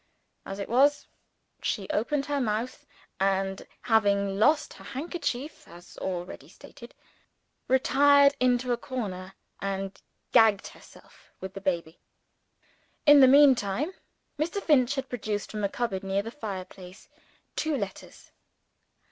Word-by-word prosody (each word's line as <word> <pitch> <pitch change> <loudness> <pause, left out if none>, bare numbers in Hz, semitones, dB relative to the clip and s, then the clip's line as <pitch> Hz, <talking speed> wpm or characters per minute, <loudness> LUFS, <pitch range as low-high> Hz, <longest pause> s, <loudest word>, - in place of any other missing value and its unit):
As 195 - -6
it 200 - -5
was, 275 +5 +3 0.6
she 195 -2 -2
opened 275 +6 -1
her 290 -2 -1
mouth; 225 +2 -3 0.3
and 195 0 -1 0.2
(having 200 -3 +2
lost 295 +6 +3
her - - -14
handkerchief 290 -1 -5
as 175 +1 -14
already 180 -1 -5
stated) - - -14 0.7
retired 280 +2 +5
into 250 0 +2
a - - -1
corner, 195 -7 -6 0.2
and 195 0 -4 0.3
gagged 220 -4 +4
herself - - -18
with 190 0 -7
the 195 - -8
baby. 170 -4 -2 1.1
In 290 -1 +8
the 265 - +8
meantime, 265 - +4 0.5
Mr. 340 +6 -1
Finch 285 -7 +2
had 270 -1 -3
produced 215 -4 -4
from 210 -1 -4
a 200 - +1
cupboard 200 -4 -3
near 195 +1 -1
the 225 - -7
fireplace, 190 -6 -8 0.5
two 310 -2 -1
letters. 200 -5 -8
225 Hz, 125 wpm, -27 LUFS, 195-275 Hz, 1.1 s, In